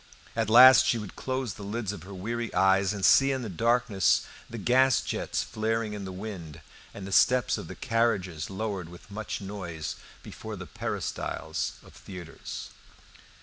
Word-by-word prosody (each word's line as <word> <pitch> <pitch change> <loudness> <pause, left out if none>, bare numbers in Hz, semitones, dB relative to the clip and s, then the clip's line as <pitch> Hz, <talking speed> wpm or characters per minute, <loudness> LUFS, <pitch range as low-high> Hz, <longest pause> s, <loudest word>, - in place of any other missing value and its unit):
At 110 -2 0
last 125 +2 +9
she 120 - +2
would 105 -3 -7
close 130 -5 -3
the 105 - -12
lids 105 0 -3
of 105 - -8
her 95 +3 -10
weary 115 +4 -3
eyes, 95 0 +4
and 100 -2 -1
see 135 0 +6
in 130 -2 -2
the 110 - -5
darkness 115 +1 +2 0.2
the 115 - -7
gas 125 +3 +4
jets - - -2
flaring 110 0 -2
in 100 -2 -5
the 95 - -6
wind 90 -5 -7 0.3
and 100 - -8
the 100 - -7
steps 125 +5 +4
of - - -7
carriages 95 -9 0
lowered 95 -3 -4
with 90 +3 -14
much 110 +1 -5
noise 95 -5 -5 0.3
before - - -8
the - - -8
peristyles - - -3
of - - -16
theatres. 90 -4 -9
105 Hz, 165 wpm, -28 LUFS, 95-115 Hz, 0.3 s, last